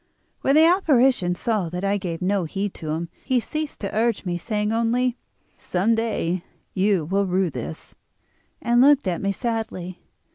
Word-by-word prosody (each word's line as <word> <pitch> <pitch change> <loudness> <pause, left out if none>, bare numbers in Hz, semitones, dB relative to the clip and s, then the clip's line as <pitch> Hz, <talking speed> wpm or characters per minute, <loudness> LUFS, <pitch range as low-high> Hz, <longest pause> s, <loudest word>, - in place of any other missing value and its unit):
"When 275 - +3
the 315 +1 +7
apparition 265 - +3
saw 205 -3 -1
that 180 +3 -5
I 200 +1 +2
gave 180 -3 -4
no 190 -1 +1
heed 195 +4 -3
to 155 - -7
him 165 +2 -2
he 260 -2 +2
ceased 305 +5 -5
to 200 0 -4
urge 225 -1 +1
me, 175 -1 -1
saying 210 +2 -1
only: 235 +2 +1 0.4
'Some 190 +6 0
day 210 -6 -1 0.3
you 190 -4 +2
will 195 +4 0
rue 185 -1 +1
this,' 80 - -7 0.7
and 240 +1 +4
looked 285 -4 +5
at 175 -2 -1
me 200 - 0
sadly. 200 -5 -4
205 Hz, 170 wpm, -23 LUFS, 180-235 Hz, 0.7 s, the